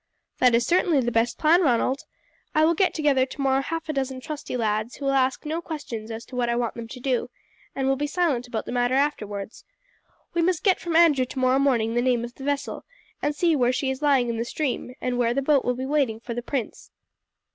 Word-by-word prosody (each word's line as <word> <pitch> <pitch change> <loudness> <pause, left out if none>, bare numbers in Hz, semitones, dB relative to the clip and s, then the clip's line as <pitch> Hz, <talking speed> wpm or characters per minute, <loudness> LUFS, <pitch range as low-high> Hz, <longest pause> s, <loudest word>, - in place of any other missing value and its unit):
"That 250 -2 +5
is 235 - +2
certainly 345 -4 +3
the 240 -2 0
best 230 +1 +1
plan, 330 +3 +4
Ronald. 265 -2 +1 0.5
I 310 0 +5
will 335 - +4
get 370 +3 +1
together 290 -4 +3
tomorrow 270 -1 0
half 325 +3 -4
a 310 - -2
dozen 265 -2 -2
trusty 290 -1 -5
lads 215 +1 -1
who 280 - -7
will 275 - +2
ask 265 +2 +1
no 320 +3 -2
questions 245 -10 -6
as 225 0 -6
to 255 - -11
what 245 -1 0
I 235 - +1
want 240 -1 -1
them 235 -1 -7
to 250 - -9
do, 250 -1 -1 0.5
and 270 -1 -1
will 270 - +3
be 295 +2 -1
silent 295 -7 0
about 230 -3 -4
the - - -6
matter 245 +1 +1
afterwards. 210 -8 -2 0.7
We 340 - +1
must 345 -1 +1
get 385 -3 +3
from 340 -2 -3
Andrew 310 -6 +5
tomorrow 260 +1 +1
morning 235 -5 +2
the 240 - +2
name 245 -2 +1
of 240 - -10
the 270 - -11
vessel, 285 0 -2 0.4
and 295 0 0
see 335 0 +2
where 250 -3 +3
she 265 +1 -1
is 265 +2 -5
lying 275 -4 +3
in 230 -1 -2
the 230 - -1
stream, 255 -2 -3
and 250 -1 -2
where 240 0 +2
the 275 - +1
boat 280 -1 +3
will 250 - 0
be 260 +1 -4
waiting 270 -6 0
for 235 +1 -6
the 240 - -3
prince." 250 -1 -4
265 Hz, 235 wpm, -25 LUFS, 240-295 Hz, 0.7 s, That